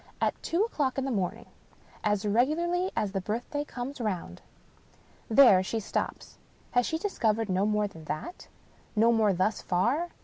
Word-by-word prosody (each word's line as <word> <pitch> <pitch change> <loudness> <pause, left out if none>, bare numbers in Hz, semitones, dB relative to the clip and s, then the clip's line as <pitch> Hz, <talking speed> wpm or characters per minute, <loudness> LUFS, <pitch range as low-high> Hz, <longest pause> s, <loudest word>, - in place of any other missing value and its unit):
At - - 0
two 345 +5 +1
o'clock 290 - -1
in 270 - 0
the 270 - -1
moming. 200 +1 -2 0.6
As 210 -1 +1
regularly 335 - +1
as 205 - 0
the 195 0 -2
birthday 240 +9 -3
comes 260 -1 -6
round." 185 - -3 0.9
There 225 -6 +7
she 225 +4 -2
stops. 210 - -4 0.3
Has 245 -1 +2
she 320 - -1
discovered 225 - 0
no 190 +2 +1
more 210 -1 +1
than 165 -6 -13
that? 155 - -6 0.5
No 225 +2 +5
more 220 -3 +3
thus 190 +4 0
far. 245 - +1
225 Hz, 160 wpm, -28 LUFS, 200-275 Hz, 0.9 s, There